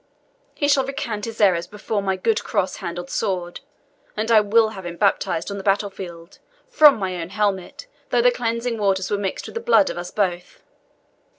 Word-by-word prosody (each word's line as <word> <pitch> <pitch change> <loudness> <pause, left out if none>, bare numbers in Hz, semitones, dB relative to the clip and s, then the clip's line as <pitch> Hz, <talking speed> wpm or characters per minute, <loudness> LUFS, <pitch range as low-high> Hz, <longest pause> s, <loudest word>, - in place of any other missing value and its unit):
He 285 - 0
shall 280 -2 +4
recant 225 -6 -4
his 225 -1 -7
errors 180 -5 +3
before 210 +1 -3
my 190 -1 0
good 210 +4 0
cross 200 -3 -1
handled 175 +1 -6
sword, 180 -4 -2 0.6
and 220 +2 -1
I 220 -2 +7
will 220 +2 +3
have 195 -3 -9
him 175 -1 -7
baptized 200 -2 0
on 200 - -4
the - - -7
battle 200 +1 +1
field, 170 -3 -10 0.3
from 310 - +6
my 185 -4 -3
own 165 - -6
helmet, 205 - -2 0.2
though 240 -1 +2
the 245 - +6
cleansing 235 -1 -2
waters 190 -2 0
were 205 - +1
mixed 195 -2 -3
with - - -9
the 460 - -4
blood 380 -11 +4
of - - -6
us 175 0 -6
both. 180 -4 -3
205 Hz, 195 wpm, -22 LUFS, 185-230 Hz, 0.6 s, I